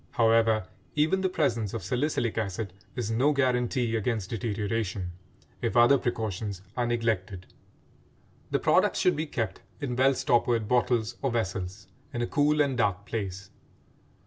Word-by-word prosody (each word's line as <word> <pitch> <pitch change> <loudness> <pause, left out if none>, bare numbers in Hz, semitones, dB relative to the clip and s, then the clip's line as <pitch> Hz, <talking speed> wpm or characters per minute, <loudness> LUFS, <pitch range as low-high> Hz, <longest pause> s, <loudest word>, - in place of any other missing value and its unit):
However, 115 -2 +3 0.3
even 155 +6 +2
the 190 - +1
presence 120 - 0
of - - -4
salicylic 125 +1 0
acid 100 -2 -3 0.2
is 115 -3 -2
no 130 +7 +3
guaranty 125 -3 +1
against 110 -3 -1
deterioration, 105 -4 -2 0.5
if - - 0
other 120 +3 +6
precautions 105 -5 -3
are 120 -1 0
neglected. 110 -6 -1 1.0
The - - +2
products - - +3
should 180 - +3
be 155 +2 -2
kept 115 -8 -3 0.2
in 135 -5 -3
well 135 +2 +4
stoppered 120 -3 +2
bottles 120 -1 +1
or 135 - +1
vessels, 95 -3 -3 0.3
in 120 - 0
a - - +1
cool 150 +2 +2
and 140 -3 +1
dark 100 -4 0
place. 100 -3 -5
115 Hz, 145 wpm, -28 LUFS, 105-125 Hz, 1.0 s, other